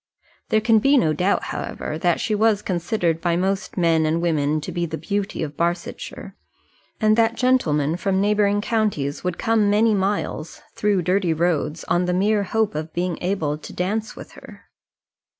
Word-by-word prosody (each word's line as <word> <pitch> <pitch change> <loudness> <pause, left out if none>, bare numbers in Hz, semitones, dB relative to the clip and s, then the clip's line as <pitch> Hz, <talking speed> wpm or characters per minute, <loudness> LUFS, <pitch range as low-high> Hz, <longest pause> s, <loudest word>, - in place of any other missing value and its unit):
There 215 - +3
can 220 0 +4
be 275 +5 +4
no 155 -10 +3
doubt, 180 +6 +1
however, - - -5
that 175 0 +1
she 215 - -1
was 210 -1 +2
considered 175 -2 -1
by 170 -1 +1
most 190 +3 -2
men 165 -2 +3
and 155 +1 +1
women 155 -3 +1
to - - -6
be 175 -1 -2
the 160 0 -5
beauty 200 -2 -3
of 150 -1 -6
Barsetshire, 175 - -4 0.6
and 215 -1 +4
that 230 0 +3
gentlemen 165 - +1
from 190 +1 0
neighbouring 205 0 +2
counties 205 -11 -1
would 180 -1 -2
come 220 -2 +2
many 215 +2 +3
miles 195 -5 -2
through 205 -3 +1
dirty 180 -1 +1
roads 165 -1 -1
on 175 +1 +1
the 180 0 0
mere 205 +3 +2
hope 220 +2 0
of 155 +1 -5
being 175 -1 -2
able 160 -6 -1
to - - -10
dance 215 +5 -2
with - - -11
her. - - -14
185 Hz, 175 wpm, -22 LUFS, 165-210 Hz, 0.6 s, can